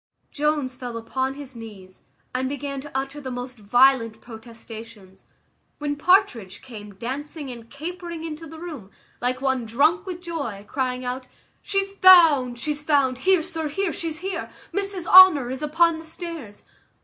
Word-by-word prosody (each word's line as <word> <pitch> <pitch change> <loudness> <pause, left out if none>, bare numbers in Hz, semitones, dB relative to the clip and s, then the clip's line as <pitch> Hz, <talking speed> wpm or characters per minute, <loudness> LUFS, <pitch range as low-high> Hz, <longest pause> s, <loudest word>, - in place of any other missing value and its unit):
Jones 295 -3 0
fell 245 -2 -7
upon 260 +4 -3
his 280 -3 -9
knees, 205 -5 -12 0.3
and 260 +1 -1
began 280 -1 -4
to 295 +1 -11
utter 275 +2 -4
the 265 - -6
most 250 -1 -7
violent 230 +1 +3
protestations, 225 -3 -12 0.5
when 290 -1 -2
Partridge 290 - +2
came 210 -6 -10
dancing 275 - -5
and 230 -2 -11
capering 340 +2 -7
into 325 0 -7
the 320 +1 -11
room, 310 - -8 0.3
like 250 +1 -1
one 265 -2 0
drunk 305 - +2
with 360 -2 -5
joy, 285 - -5
crying 255 -1 -2
out, 255 +1 -4 0.3
"She's 390 -1 -1
found! 330 -11 +6
she's 295 +4 -2
found! 280 -4 +2
Here, 370 -4 +5
sir, 320 -1 -3
here, 360 +4 -2
she's 325 -1 -4
here 385 - -3 0.2
Mrs 395 -3 -2
Honour 335 -9 +8
is 260 +2 -5
upon 325 +2 +2
the 325 - -11
stairs." 320 - -8
275 Hz, 155 wpm, -24 LUFS, 245-325 Hz, 0.5 s, Honour